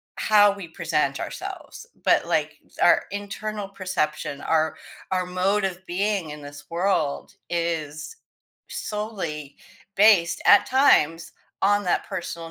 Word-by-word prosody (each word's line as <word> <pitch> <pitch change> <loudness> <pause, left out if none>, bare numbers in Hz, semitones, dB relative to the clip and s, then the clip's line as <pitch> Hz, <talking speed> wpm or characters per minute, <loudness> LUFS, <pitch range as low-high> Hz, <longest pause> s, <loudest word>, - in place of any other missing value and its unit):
how 205 -1 +5
we 200 -3 -8
present 160 - -1
ourselves, 475 - -7 0.2
but, - - +3
like, - - 0 0.3
our - - +5
internal 205 +1 -5
perception, 155 -7 -3
our 160 -1 +1 0.4
our 185 -1 0
mode 185 +3 0
of 190 -1 -3
being 190 -2 -1
in 150 - -8
this 145 0 -11
world 170 -4 -1 0.2
is 165 - -3 0.5
solely 210 - -5 0.4
based, 195 -5 +5
at - - +7
times, 165 - +3 0.3
on 205 +1 +3
that 180 - 0
personal 170 -1 -6
185 Hz, 120 wpm, -24 LUFS, 160-205 Hz, 0.5 s, at